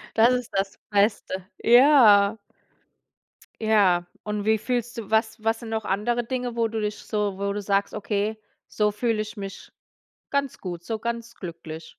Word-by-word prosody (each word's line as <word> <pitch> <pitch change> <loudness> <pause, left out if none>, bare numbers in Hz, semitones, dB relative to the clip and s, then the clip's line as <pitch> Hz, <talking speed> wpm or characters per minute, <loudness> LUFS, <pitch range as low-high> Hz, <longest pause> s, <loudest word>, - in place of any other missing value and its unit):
Das 235 +3 +5
ist 250 -2 -2
das 195 0 -1
Beste. 200 -2 +1
Ja. 230 -5 +6 1.2
Ja, 195 -5 +3 0.2
und 210 -1 -3
wie 220 -1 +3
fühlst 240 0 -2
du 210 - -8
was 220 0 0
was 225 +1 0
sind 225 - -7
noch 220 -1 -2
andere 235 +5 0
Dinge, 245 -1 -3
wo 230 -1 +1
du 225 0 -4
dich 210 0 -2
so 205 -3 -2
wo 200 0 -1
du 205 - -3
sagst: 200 0 0
„Okay, 210 +1 -2 0.3
so 210 -1 +1
fühle 220 0 0
ich 215 +2 -7
mich 195 -1 -8 0.6
ganz 280 -2 -1
gut, 175 -2 -6
so 220 +3 -4
ganz 235 0 -4
glücklich?” 165 -3 -8
215 Hz, 165 wpm, -25 LUFS, 200-230 Hz, 1.2 s, Ja